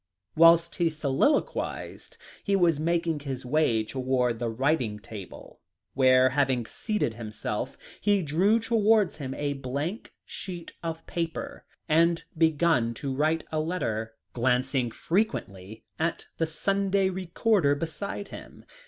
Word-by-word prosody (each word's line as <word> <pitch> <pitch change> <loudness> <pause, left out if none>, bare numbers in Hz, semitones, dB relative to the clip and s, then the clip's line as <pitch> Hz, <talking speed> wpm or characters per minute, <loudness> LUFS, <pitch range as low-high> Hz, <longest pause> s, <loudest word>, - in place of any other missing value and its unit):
Whilst 165 +1 +6
he 170 -2 +2
soliloquized, 155 - -1 0.3
he 200 - +1
was 170 -5 +3
making 165 -1 0
his 135 -3 -5
way 125 -5 +2
towards 125 -1 0
the 120 -1 -1
writing 125 -2 0
table, 105 -3 -10 0.3
where, 130 -1 +5
having 130 -4 +1
seated 210 - -2
himself, 110 +2 -5 0.2
he 205 -2 +2
drew 180 +9 +3
towards 220 -4 +3
him 135 -3 -5
a 145 -1 -1
blank 140 - -4
sheet 175 -3 -7
of 165 -1 -5
paper 165 -1 -4 0.2
and 165 +1 +3
began 160 -7 +2
to 135 +3 -4
write 155 +4 +1
a 155 - 0
letter, 115 -10 -2 0.2
glancing 125 +1 +1
frequently 110 - -2 0.2
at 165 +1 -1
the 165 - +1
Sunday 195 +3 +1
Recorder 185 -3 +1
beside 180 +6 -5
him. - - -11
155 Hz, 125 wpm, -27 LUFS, 130-170 Hz, 0.3 s, Whilst